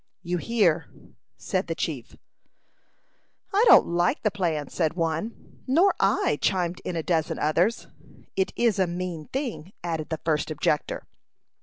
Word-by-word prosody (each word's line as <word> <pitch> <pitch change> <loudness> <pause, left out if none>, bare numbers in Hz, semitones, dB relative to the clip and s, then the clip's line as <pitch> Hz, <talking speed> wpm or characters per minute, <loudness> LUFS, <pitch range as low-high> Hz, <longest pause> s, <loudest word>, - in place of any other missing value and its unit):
"You 175 0 -1
hear," 175 -7 +2 0.5
said - - -2
the - - -2
chief. - - -4 1.4
"I 410 +3 +4
don't - - +8
like 175 +1 0
the 215 - +2
plan," 165 -7 -1
said 160 -2 -1
one. 165 +6 -3
"Nor 340 +10 +4
I," - - +2
chimed 180 -2 0
in 180 - -4
a 165 - -2
dozen 160 -2 0
others. 175 +9 +1 0.5
"It 190 - +1
is 230 -4 +2
a 190 - +3
mean 175 -3 -4
thing," 245 - -4
added 160 -3 -3
the 160 - -2
first 155 -2 +1
objector. 150 -1 -1
175 Hz, 145 wpm, -26 LUFS, 160-205 Hz, 1.4 s, don't